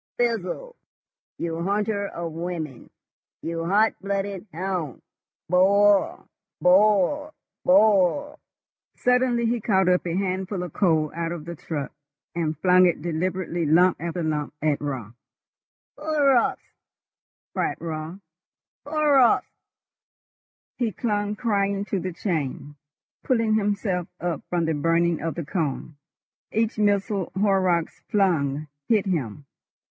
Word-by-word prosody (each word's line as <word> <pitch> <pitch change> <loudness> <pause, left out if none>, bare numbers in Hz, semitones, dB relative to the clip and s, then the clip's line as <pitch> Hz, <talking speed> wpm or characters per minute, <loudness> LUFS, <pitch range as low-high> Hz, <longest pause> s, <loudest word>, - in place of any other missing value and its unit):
Fizzle, 240 - -2 0.6
you 165 0 -3
hunter 200 +2 0
of 170 -2 -5
women! 165 -5 -5 0.5
You 165 0 -3
hot 210 +4 +3
blooded 200 0 -3
hound! 175 -5 -4 0.4
Boil! 200 +3 +3 0.3
boil! 210 +11 +3 0.3
boil!" 220 - +3 0.6
Suddenly 250 -1 +2
he 235 0 0
caught 190 -3 +2
up 180 0 +3
a 170 - -1
handful 190 0 -2
of 175 - -7
coal 160 -6 +2
out 165 0 -3
of 170 -3 -6
the 170 - -5
truck, 150 -3 -5 0.4
and 160 -3 -2
flung 185 +2 +5
it 165 -3 -1
deliberately, 175 +1 -2
lump 175 +2 +4
after 170 0 -3
lump, 150 -2 -2
at 150 -2 0
Raut. 130 -7 -4 0.9
"Horrocks!" 280 -6 +2 0.9
cried - - -1
Raut. 160 +3 -6 0.7
"Horrocks!" 290 -4 +4 1.3
He 235 -3 0
clung 205 0 -1
crying 200 -3 0
to 195 -1 -2
the 185 +1 -4
chain, 155 -5 -3 0.5
pulling 230 -4 +1
himself 200 -4 0
up 175 -3 -2
from 175 -2 0
the 160 - 0
burning 165 +2 +1
of 165 +1 -3
the 170 -3 -4
cone. 155 -2 -3 0.6
Each 225 0 0
missile 200 -2 +1
Horrocks 185 -4 +1
flung 155 -8 +1 0.2
hit 215 -4 +2
him. 145 - -3
185 Hz, 115 wpm, -24 LUFS, 165-210 Hz, 1.3 s, flung